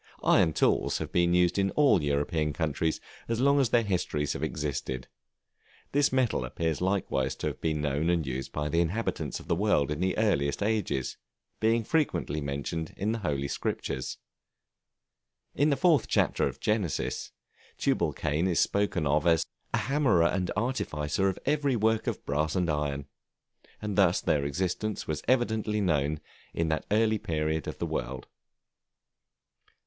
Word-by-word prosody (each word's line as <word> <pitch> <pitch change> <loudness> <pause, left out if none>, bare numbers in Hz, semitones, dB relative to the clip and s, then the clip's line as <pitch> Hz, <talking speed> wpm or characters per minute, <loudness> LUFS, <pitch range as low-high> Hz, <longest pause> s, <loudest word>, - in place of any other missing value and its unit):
Iron 80 - +4
tools - - +2
have - - -5
been 85 0 +3
used 90 +1 +3
in 95 0 +2
all 140 - +5
European 75 +2 0
countries 80 0 -1 0.3
as 115 0 -1
long 140 +2 +4
as 130 -4 +3
their 115 0 +3
histories 85 -7 -1
have - - -6
existed; 75 -4 -3 0.8
this 145 0 +3
metal 130 - +1
appears 80 +5 -2
likewise 90 -9 0
to - - -5
have - - -3
been 80 -2 0
known 75 +3 0
and 85 -3 +1
used 65 0 -4
by 75 +1 -2
the 85 +3 +1
inhabitants 95 +8 -2
of - - -13
the - - +2
world 85 -6 +2
in 75 - -2
the 95 +1 0
earliest 70 -7 +1
ages, 100 - -1 0.4
being 115 +1 +2
frequently 110 - 0
mentioned 70 +3 -4
in 105 +3 0
the 115 - -2
Holy 70 -7 -1
Scriptures. 65 -1 -3 1.4
In 145 +3 +2
the 140 - +2
fourth 160 0 +3
chapter - - +2
of - - -7
Genesis, 105 -8 -1 0.5
Tubalcain 75 +5 0
is 90 -3 +1
spoken 100 -5 +1
of 75 +3 +2
as 80 -2 +4 0.3
"a - - +1
hammerer 135 - +2
and 90 +1 0
artificer 95 - 0
in 95 - -3
every 145 -2 +1
work 110 0 +1
of - - -3
brass 75 +2 0
and 90 -3 +1
iron," 70 -2 -2 0.7
and 105 -2 -3
thus 95 -3 +4
their 70 -2 +1
existence 95 +8 -2
was 75 -1 -2
evidently 110 -4 +1
known 75 -5 +1 0.4
at 85 -1 0
that 80 - -1
early 110 +1 +2
period 80 -2 -1
of - - -5
the - - -2
world. 65 +1 -4
85 Hz, 160 wpm, -28 LUFS, 75-110 Hz, 1.4 s, all